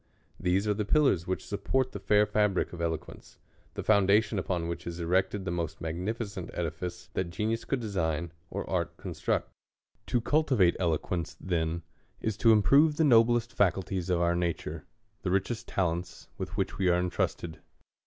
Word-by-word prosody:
These 95 +3 +1
are 105 - +3
the 105 +1 -1
pillars 105 - +3
which 95 - -2
support 130 +5 0
the - - -6
fair 105 0 +4
fabric 105 -4 +1
of 85 - -6
eloquence; 80 -2 -5 0.4
the - - -4
foundation, 105 +1 +3
upon 90 -2 -2
which 85 0 -5
is 85 0 -5
erected 95 +3 0
the 90 - -2
most 85 -2 -3
magnificent 95 +4 -4
edifice, 85 +1 -4
that 95 -2 -1
genius 110 +5 -2
could 135 - -1
design, 85 -6 -1 0.2
or - - -4
art - - -2
construct. - - -2 0.6
To 120 - +2
cultivate 125 - +3
elo 85 -4 +2
quence, 85 -3 -4
then, 85 -2 -1 0.4
is. 110 -2 -2
to 115 - +5
improve 140 +9 +5
the 160 - +3
noblest 120 -3 +4
faculties 95 -1 0
of 90 -2 +2
our 85 0 +3
natnre, 85 -2 -2 0.4
the 95 - -2
richest 110 +5 -1
talents 90 -1 -2
with - - -6
which - - -2
we 95 - +2
are 90 - +4
entrusted. 85 -2 -2
95 Hz, 165 wpm, -29 LUFS, 85-110 Hz, 0.6 s, to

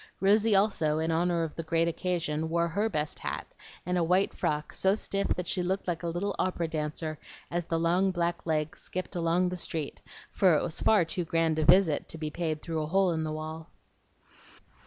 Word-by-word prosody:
Rosy 210 +2 +4
also, 185 -7 +2
in 160 +1 0
honor 170 +1 +1
of 160 - -4
the - - -4
great 165 +1 +1
occasion, 165 -3 -1
wore 170 +1 +1
HER 205 +7 0
best 150 -6 -2
hat, - - -5 0.3
and 180 0 0
a - - +2
white 180 +4 +2
frock 150 0 -2
so 190 +1 +2
stiff 200 -2 -1
that 180 - -3
she 185 - 0
looked 190 +2 -1
like 170 -2 -1
a 170 - -3
little 180 +4 -2
opera 175 -2 0
dancer 155 0 -3 0.3
as 175 0 -1
the 165 - -1
long 175 +4 +2
black 175 -2 -1
legs 155 -1 -1
skipped 185 +1 -5
along 175 +1 +2
the 180 - -4
street; 160 -4 -4 0.3
for 185 -4 +4
it - - +1
was 160 - -2
far 205 -6 +4
too 175 +2 -3
grand 165 -1 +1
a 155 - +1
visit 175 -2 +4
to 165 - -7
be 155 -1 -4
paid 155 -2 -3
through 160 -2 -2
a 155 - -3
hole 190 +2 +3
in 160 -1 -1
the 155 - -2
wall. 155 +1 -6
170 Hz, 210 wpm, -29 LUFS, 160-180 Hz, 0.3 s, Rosy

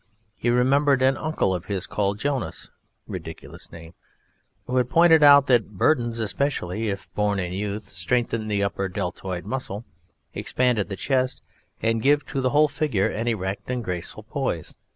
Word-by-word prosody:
He 120 - -1
remembered 135 +2 +3
an 135 +1 +4
uncle 155 -12 0
of 90 -2 -4
his 100 -2 -2
called 100 -1 -1
Jonas 135 -2 -3 0.4
(ridiculous - - -9
name) 85 0 -11 0.7
who 125 - -1
had 125 -1 +2
pointed 165 +1 +6
out 140 -1 +8
that 115 -6 +2
Burdens, 120 -2 +2
especially 110 -2 -1
if 100 -1 -6
borne 105 -1 +1
in 90 -2 -3
youth, 105 +2 -3
strengthen 110 +6 -1
the 100 -1 0
upper 100 -1 -2
deltoid 90 -1 -4
muscle, 115 -2 -4 0.5
expand 125 -3 0
the 100 -1 -2
chest, 130 +4 -1 0.4
and 115 0 +1
give 145 +3 +3
to 135 - -3
the 130 - +2
whole 150 +3 +4
figure 135 -10 0
an 115 +2 -3
erect 100 -3 -2
and 125 -1 -2
graceful 90 -4 -5
poise. - - -3
115 Hz, 160 wpm, -24 LUFS, 100-130 Hz, 0.7 s, out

